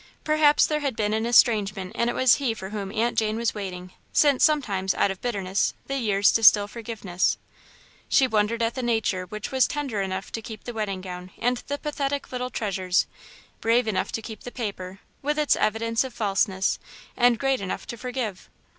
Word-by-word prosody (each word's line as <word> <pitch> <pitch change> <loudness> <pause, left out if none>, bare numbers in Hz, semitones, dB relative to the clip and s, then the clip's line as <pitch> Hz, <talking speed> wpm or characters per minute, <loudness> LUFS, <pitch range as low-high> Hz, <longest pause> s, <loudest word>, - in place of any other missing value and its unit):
Perhaps 305 -1 +4
there 300 -1 0
had 280 -5 -2
been 210 -1 0
an 220 +1 0
estrangement 205 -5 +3
and 235 +1 0
it - - -2
was 260 -2 +5
he 255 -6 -1
for 190 -2 -7
whom 200 -2 -4
Aunt 230 +2 0
Jane 215 -1 +1
was 235 0 0
waiting, 185 -3 -6 0.2
since 285 -4 +4
sometimes, 205 -12 +2
out 200 - +2
of 190 - -8
bitterness, 195 -5 -1
the 275 - -3
years 205 -4 +3
distil 215 -2 +6
forgiveness. 210 -5 -2 0.7
She 270 - +5
wondered 225 0 +1
at 230 +1 0
the 255 - -4
nature 220 -6 0
which 215 +1 -6
was 260 -1 +3
tender 275 -9 -2
enough 190 0 -4
to 225 - -4
keep 220 -1 -9
the 240 - -6
wedding 205 -4 -3
gown 180 -1 -7
and 245 +1 +1
the 285 - -2
pathetic 285 -1 -3
little 250 0 -3
treasures, 190 -5 0 0.5
brave 230 +1 +2
enough 210 -3 -1
to 225 - -3
keep 220 0 -8
the - - -7
paper, 200 -5 -6 0.2
with 295 +2 -1
its 300 -1 +3
evidence 225 +2 +1
of 260 - -8
falseness, 195 -2 +1 0.4
and 245 -1 +4
great 270 -1 0
enough 190 - -4
to 235 - -6
forgive. 235 -4 -5
225 Hz, 190 wpm, -25 LUFS, 195-250 Hz, 0.7 s, distil